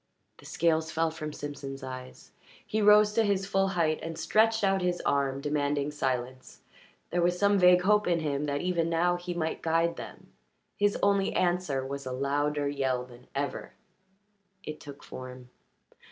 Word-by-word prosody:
The - - -16
scales 160 -1 +1
fell 160 0 0
from 155 -1 -6
Simpson's 140 -2 -7
eyes. 130 -1 -9 0.3
He 215 - -1
rose 210 0 +6
to 225 +1 +3
his 200 -2 +1
full 195 -1 +1
height 155 -2 +2
and 165 0 -6
stretched 220 0 +2
out 195 -1 +2
his 180 -1 0
arm, 140 -1 0
demanding 145 0 -1
silence; 130 -2 -3 0.5
there 175 - +1
was 175 +1 +2
some 200 +1 +3
vague 180 0 +6
hope 210 +1 +3
in 170 -1 +2
him 145 -1 -1
that 145 -1 -2
even 170 -2 0
now 175 +2 +2
he 175 0 -5
might 160 -2 -2
guide 165 +1 +1
them. - - -10 0.4
His 205 0 +1
only 200 -1 +2
answer 175 -7 0
was 140 0 -5
a - - -3
louder 145 +2 0
yell 130 -3 -1
than 125 0 -16
ever. 140 -1 -3 0.9
It 155 -3 -7
took 145 -2 -11
form. 125 -1 -10
160 Hz, 170 wpm, -29 LUFS, 140-180 Hz, 0.9 s, rose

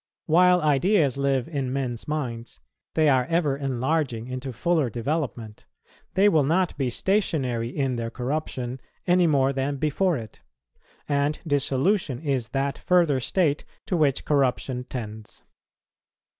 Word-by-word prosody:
While 180 +2 +5
ideas 155 - +3
live 135 -2 0
in 140 -5 -3
men's 130 -4 -3
minds, 120 - -4 0.4
they 155 -1 +4
are 130 -3 +4
ever 160 -2 +1
enlarging 135 -2 -1
into 130 +1 -5
fuller 155 +2 +1
development: 120 -4 -4 0.5
they 195 +2 +5
will 160 -8 +4
not 170 +5 +1
be 135 -3 -1
stationary 130 - 0
in 130 -2 -1
their 115 0 -3
corruption 130 -1 -4 0.2
any 180 -1 +4
more 140 -3 +2
than 135 +1 -1
before 155 +4 +1
it; 110 -3 -10 0.7
and 145 +1 +1
dissolution 145 - +1
is 135 -7 -1
that 135 +2 -2
further 170 -7 +3
state 150 +2 0 0.2
to 200 - -1
which 145 -5 +1
corruption 130 -3 0
tends. 110 -4 -8
140 Hz, 130 wpm, -25 LUFS, 125-160 Hz, 0.7 s, While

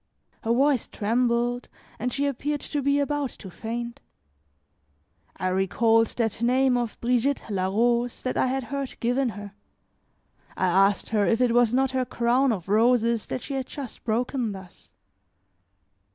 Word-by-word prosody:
Her 225 - -1
voice 270 +1 +2
trembled, 240 +2 0 0.3
and 250 - -1
she 280 +2 -1
appeared 285 +2 -2
to 290 - -3
be 280 +1 +2
about 285 -1 -1
to 190 - -10
faint. 235 +4 -5 1.4
I 185 - -1
recalled 225 +5 +3
that 225 -2 -1
name 255 +2 +3
of 240 -3 -2
Brigitte 250 +3 +1
la 185 -2 0
Rose 235 +4 +1
that 255 - -2
I - - +2
had 265 +1 -1
heard 275 -2 -4
given 245 +2 +1
her. 205 -1 -8 1.1
I - - +1
asked 195 +2 +3
her 210 -3 +2
if 230 - +2
it 250 -2 +3
was 240 -2 +4
not 265 +1 +2
her 260 -1 0
crown 245 +3 +2
of 190 -6 -4
roses 230 +1 +2
that 255 - -4
she 280 - -5
had 265 -1 -3
just 275 -5 -8
broken 240 0 -1
thus. 190 -2 -13
240 Hz, 155 wpm, -25 LUFS, 225-260 Hz, 1.4 s, was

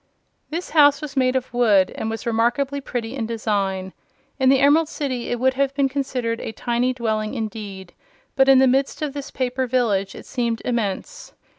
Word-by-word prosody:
This 340 +3 -5
house 290 -3 +5
was 295 -1 -7
made 255 -1 +2
of 255 -1 -2
wood, 210 -6 +4
and 220 - -4
was 225 0 -5
remarkably 240 +5 0
pretty 240 -3 -4
in 230 -5 -3
design. 200 -4 -2 0.5
In 260 -1 +4
the 270 - +6
Emerald 295 +4 +4
City 260 -6 -3
it 240 - -2
would 260 +1 +3
have 275 +1 0
been 280 -1 +2
considered 260 -4 -2
a 220 - -5
tiny 240 +3 0
dwelling, 220 -2 -2
indeed; 205 -5 -6 0.4
but 270 0 +4
in 270 - +8
the 265 - +6
midst 270 +4 +1
of 290 -2 -3
this 285 -1 -6
paper 255 0 -2
village 215 -6 0
it - - -10
seemed 235 -2 -2
immense. 235 - -3
250 Hz, 185 wpm, -22 LUFS, 225-270 Hz, 0.5 s, in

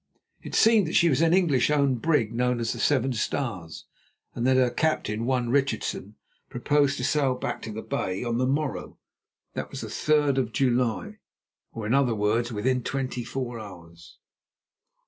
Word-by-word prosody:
It - - -7
seemed 220 -5 +5
that 160 - -3
she 170 - +5
was 145 0 +2
an 165 0 +4
English 165 -9 +3
owned 140 -5 +2
brig 130 -9 +1
known 125 +1 0
as 115 -1 -1
the - - -8
Seven 135 -2 +2
Stars, 105 - -3 0.5
and 120 - -1
that 130 0 +4
her 125 -2 +3
captain, 120 -6 -1
one 125 -2 0
Richardson, 120 -6 -1 0.3
proposed 140 +3 +1
to - - -4
sail 140 -4 +1
back - - -4
to 110 - -6
the 110 +1 -6
Bay 95 -7 -3
on 120 0 -1
the 130 - +1
morrow, 145 +1 -2 0.6
that - - -5
was - - -7
the - - -7
third 150 -3 +2
of 115 -4 -2
July, 130 - 0 0.5
or 110 - -6
in 110 - 0
other 135 -4 +3
words, 110 +3 0
within 125 +4 0
twenty 130 -1 -3
four 120 -1 -5
hours. 85 -5 -12
125 Hz, 175 wpm, -26 LUFS, 115-140 Hz, 0.6 s, seemed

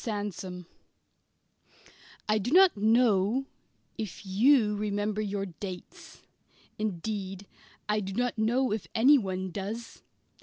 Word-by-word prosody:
SANDSOME 200 -4 -4 1.6
I 215 0 +2
do 210 - -3
not 370 +5 +6
know 220 +2 +3 0.5
if 210 -2 -6
you 215 +2 +4
remember 205 0 -1
your 200 -1 -2
"dates." 185 0 -9 0.6
Indeed, 195 -1 -4 0.4
I 210 0 +1
do 195 -1 -5
not 245 +4 -1
know 235 +4 +1
if 215 -2 -3
anyone 200 -8 +3
does. 210 +5 -6
210 Hz, 105 wpm, -29 LUFS, 195-225 Hz, 1.6 s, not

